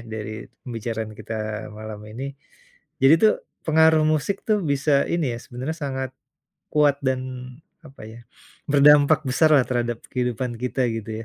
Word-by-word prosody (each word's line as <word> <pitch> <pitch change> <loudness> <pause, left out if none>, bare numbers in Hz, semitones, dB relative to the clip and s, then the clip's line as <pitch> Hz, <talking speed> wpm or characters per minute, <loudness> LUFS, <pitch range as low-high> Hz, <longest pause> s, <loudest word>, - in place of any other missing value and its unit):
dari 110 -1 -5 0.3
pembicaraan 115 -2 -5
kita - - -7 0.4
malam 110 -1 -8
ini. 115 +5 -7 0.8
Jadi 135 +4 +8
tuh, 215 - +7 0.3
pengaruh 160 0 +5
musik 155 +6 0
tuh, 215 - +3
bisa 140 +1 +1 0.2
ini 170 -3 +1
ya, - - -6
sebenarnya 135 +5 -5
sangat 130 -2 -3 0.6
kuat 145 -2 +4
dan, 130 -1 +1 0.7
apa 135 - -14
ya? 110 +1 -11 0.5
Berdampak 145 +1 +6
besarlah, 150 0 +4
terhadap 120 -2 -1
kehidupan 125 -1 -2
kita, 125 0 0
gitu 110 -1 -6
130 Hz, 135 wpm, -23 LUFS, 120-150 Hz, 0.8 s, Jadi